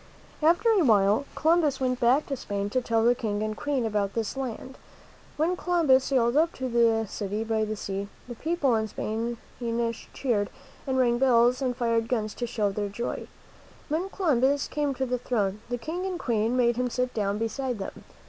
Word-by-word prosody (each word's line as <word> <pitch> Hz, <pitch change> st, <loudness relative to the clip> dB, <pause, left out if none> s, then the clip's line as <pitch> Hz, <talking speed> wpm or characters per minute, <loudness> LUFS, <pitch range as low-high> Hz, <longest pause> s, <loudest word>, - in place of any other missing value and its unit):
After 345 Hz, +9 st, +3 dB
a 405 Hz, -5 st, +4 dB
while, 210 Hz, 0 st, +4 dB
Columbus 315 Hz, -4 st, +2 dB
went 255 Hz, -1 st, 0 dB
back 255 Hz, +5 st, +3 dB
to 275 Hz, -, -3 dB
Spain 205 Hz, -4 st, -3 dB
to 255 Hz, -, +1 dB
tell 230 Hz, -2 st, +1 dB
the 240 Hz, -, +6 dB
King 215 Hz, -4 st, -2 dB
and 215 Hz, 0 st, -2 dB
Queen 275 Hz, -1 st, -1 dB
about 205 Hz, -2 st, -1 dB
this 225 Hz, +1 st, -2 dB
land. 265 Hz, 0 st, -5 dB, 0.6 s
When 330 Hz, +4 st, +1 dB
Columbus 325 Hz, -8 st, +3 dB
sailed 245 Hz, -2 st, +2 dB
up 325 Hz, +3 st, +3 dB
to 260 Hz, -, -4 dB
the 230 Hz, -2 st, +3 dB
city 205 Hz, +2 st, -3 dB
by 220 Hz, -1 st, 0 dB
the 215 Hz, 0 st, -3 dB
sea, 200 Hz, -1 st, -4 dB, 0.2 s
the 245 Hz, -, -6 dB
people 290 Hz, 0 st, 0 dB
in 220 Hz, -1 st, +1 dB
Spain 225 Hz, +3 st, -3 dB, 0.7 s
cheered 220 Hz, -7 st, 0 dB, 0.4 s
and 260 Hz, -1 st, 0 dB
rang 240 Hz, -2 st, +3 dB
bells 250 Hz, 0 st, +4 dB
and 250 Hz, -2 st, -1 dB
fired 230 Hz, -1 st, +1 dB
guns 215 Hz, -4 st, -1 dB
to 240 Hz, -, -4 dB
show 210 Hz, -4 st, 0 dB
their 205 Hz, +1 st, -2 dB
joy. 235 Hz, +4 st, -4 dB, 0.6 s
When 335 Hz, +6 st, -1 dB
Columbus 285 Hz, -7 st, +1 dB
came 290 Hz, -2 st, -1 dB
to 265 Hz, -, -1 dB
the 250 Hz, -1 st, -1 dB
throne, 210 Hz, -5 st, -1 dB
the 245 Hz, -, -1 dB
King 320 Hz, +9 st, -4 dB
and 370 Hz, -2 st, -3 dB
Queen 230 Hz, -1 st, 0 dB
made 240 Hz, -1 st, +3 dB
him 250 Hz, 0 st, 0 dB
sit 250 Hz, +1 st, -1 dB
down 205 Hz, -2 st, -1 dB
beside 245 Hz, +3 st, -2 dB
them. 195 Hz, -, -7 dB
240 Hz, 190 wpm, -27 LUFS, 220-270 Hz, 0.7 s, the